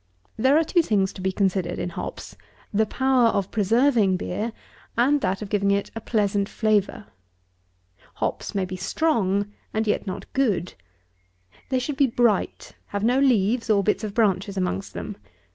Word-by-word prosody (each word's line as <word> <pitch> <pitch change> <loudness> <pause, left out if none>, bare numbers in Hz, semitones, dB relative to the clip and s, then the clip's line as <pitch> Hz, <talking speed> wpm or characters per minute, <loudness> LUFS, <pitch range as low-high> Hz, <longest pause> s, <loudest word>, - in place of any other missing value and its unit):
There 265 +6 +4
are 325 - +4
two 345 +2 +3
things 200 -9 +1
to 190 - -9
be 190 +1 0
considered 185 -2 0
in - - -3
hops: 170 - -7 0.4
the 215 +1 +2
power 260 0 +3
of 200 -4 0
preserving 225 -2 +3
beer, 210 +6 -3 0.5
and 275 +4 +3
that 195 -1 -1
of 200 - -8
giving 200 -1 +1
it 200 0 0
a 225 - -5
pleasant 205 -2 0
flavour. 215 -1 0 1.1
Hops - - -3
may 195 -2 +1
be 185 0 -6
strong; 205 - 0 0.2
and 220 +1 +1
yet 210 0 -1
not 185 - -5
good. 205 -10 0 1.0
They 260 - +1
should 270 +2 -3
be 275 - +4
bright, 230 -4 0
have 200 0 -4
no 245 +4 +3
leaves 230 -3 +2
or 200 -2 +4
bits 210 +2 0
of 210 -2 -5
branches 200 -3 +1
amongst 140 - -2
them. - - -6
210 Hz, 165 wpm, -24 LUFS, 195-240 Hz, 1.1 s, There